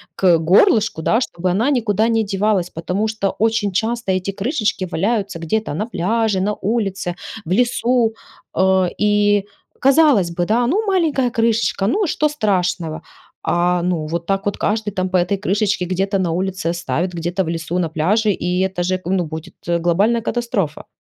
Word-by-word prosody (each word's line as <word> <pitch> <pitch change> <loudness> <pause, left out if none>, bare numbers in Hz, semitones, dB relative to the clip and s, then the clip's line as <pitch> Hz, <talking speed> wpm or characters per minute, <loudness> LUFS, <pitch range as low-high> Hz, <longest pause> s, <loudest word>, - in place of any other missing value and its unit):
к 180 -3 +4
горлышку, 205 - +3
да, 225 +7 +2
чтобы 180 -7 -2
она 220 +9 +1
никуда 220 -4 +1
не 225 -1 +2
девалась, 195 -2 0
потому 180 +6 -2
что 215 -3 -1
очень 220 -2 +1
часто 225 +2 -1
эти 185 +1 -1
крышечки 210 - -1
валяются 200 +1 -1
где-то 190 +2 -2
на 210 +8 -2
пляже, 220 -1 0
на 210 +2 0
улице, 195 -4 -2 0.3
в 165 - -6
лесу, 240 +1 +2 0.4
э. 190 -1 +3
И, 205 -1 +2 0.3
казалось 270 - +4
бы, 175 +1 -1
да, 230 +5 +2
ну 395 - +1
маленькая 315 -10 +1
крышечка- 225 -3 +1
ну 405 - +1
и - - -2
что 300 0 +1
страшного? 180 - -1 0.4
А 175 0 +1
ну 170 -4 -1
вот 170 +1 -3
так 195 +2 -1
вот 205 - -1
каждый 210 0 -1
там 185 -1 -2
по 185 - +2
этой 180 +3 +1
крышечке 200 -1 0
где-то 195 +2 -1
на 175 -3 0
улице 185 0 -2
оставит, 170 +1 -2
где-то 175 +3 -2
в 165 - -4
лесу, 165 +1 -3
на 170 - 0
пляже- 205 +8 +1
и 180 -1 -1
это 190 -2 -1
же 185 +1 0
ну 180 -1 0
будет 160 0 -8
глобальная 175 +7 +2
катастрофа. 225 -10 -2
195 Hz, 170 wpm, -19 LUFS, 175-225 Hz, 0.4 s, к